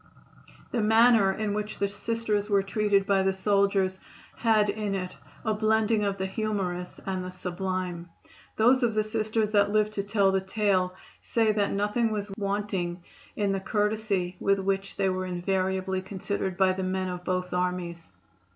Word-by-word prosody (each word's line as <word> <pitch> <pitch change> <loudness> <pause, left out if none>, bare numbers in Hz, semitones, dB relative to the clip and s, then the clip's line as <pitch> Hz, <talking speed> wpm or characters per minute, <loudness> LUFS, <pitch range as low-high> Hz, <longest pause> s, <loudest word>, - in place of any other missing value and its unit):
The 235 - 0
manner 220 -2 +5
in 210 +1 -2
which 210 0 -3
the 200 - +1
Sisters 215 0 -2
were 200 -1 +3
treated 200 0 +1
by 195 -1 +3
the 190 0 +2
soldiers 195 -1 +1 0.4
had 220 -2 +3
in 205 -1 -2
it 185 -1 -4 0.3
a 220 - +2
blending 220 0 +2
of 200 -1 -1
the 190 - -2
humorous 190 -3 -3
and 185 -1 -2
the 180 - -5
sublime. 180 -1 -4 0.5
Those 245 +4 +4
of 230 -3 +1
the 215 - +3
Sisters 215 0 -1
that 205 -1 +4
live 215 0 +2
to 210 - -2
tell 200 -1 +2
the 190 0 +1
tale 190 -2 0 0.3
say 225 -2 +2
that 205 -2 0
nothing 210 +3 +1
was 205 -2 -3
wanting 195 -4 -2 0.3
in 205 -2 0
the 195 - 0
courtesy 205 -3 -1
with 195 0 +2
which 195 0 -2
they 195 - +1
were 185 0 -2
invariably 190 +1 -1
considered 190 -1 -3
by 190 -1 +4
the 190 - -4
men 185 0 -1
of 180 -1 -5
both 185 0 -2
armies. 180 -2 -2
200 Hz, 170 wpm, -27 LUFS, 185-215 Hz, 0.5 s, manner